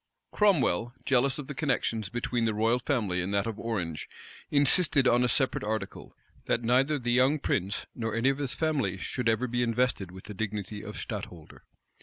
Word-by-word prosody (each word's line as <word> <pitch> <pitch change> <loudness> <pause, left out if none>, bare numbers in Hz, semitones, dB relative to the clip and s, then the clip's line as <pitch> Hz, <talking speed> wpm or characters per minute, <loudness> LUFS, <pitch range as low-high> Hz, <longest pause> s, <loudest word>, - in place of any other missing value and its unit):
Cromwell, 130 - +2
jealous 135 0 +3
of 150 - -5
the 150 - -6
connections 115 -8 -1
between 120 0 -1
the 110 -2 0
royal 115 +3 +2
family 105 -9 0
and 90 +2 -3
that 100 - +1
of 115 -2 -4
Orange, 90 -9 -3 0.4
insisted 145 -1 +4
on 120 +1 +4
a - - +3
separate 130 -1 +1
article; 105 -2 -4 0.3
that 120 - 0
neither 130 +6 +3
the 120 -3 -2
young 130 +5 +4
prince 100 -7 -1
nor 115 -2 -3
any 115 +4 +3
of 135 +1 -1
his 140 -4 -2
family 140 - 0
should 115 +5 -1
ever 115 +3 +1
be 120 0 -1
invested 120 -5 0
with 95 +1 -11
the 105 - -8
dignity 105 0 -4
of 105 -2 -8
stadtholder. 85 -4 -7
120 Hz, 185 wpm, -28 LUFS, 105-130 Hz, 0.4 s, insisted